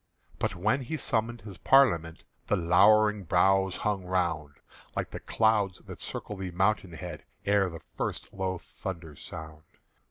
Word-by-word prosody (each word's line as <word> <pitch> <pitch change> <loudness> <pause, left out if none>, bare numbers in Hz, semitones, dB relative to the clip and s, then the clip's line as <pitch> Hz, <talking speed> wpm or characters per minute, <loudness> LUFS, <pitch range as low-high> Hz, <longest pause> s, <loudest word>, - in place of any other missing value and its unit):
But - - -1
when 110 +10 +1
he 145 +5 -3
summoned 115 -2 -1
his 100 -3 -10
Parliament, 85 -13 +4 0.2
The - - +3
lowering 105 +5 +5
brows 95 +1 +3
hung 105 -3 -1
round, 85 -5 -1 0.4
Like - - -2 0.2
clouds 105 -4 +2
that - - -10
circle 105 - -4
the 95 -1 -4
mountain 95 0 +1
head 85 -2 -7 0.2
Ere 100 -2 +3
the 80 -2 -9 0.2
first - - -3
low 95 -1 -2
thunders 85 -1 -8
sound. 80 -1 -8
95 Hz, 140 wpm, -29 LUFS, 85-105 Hz, 0.4 s, lowering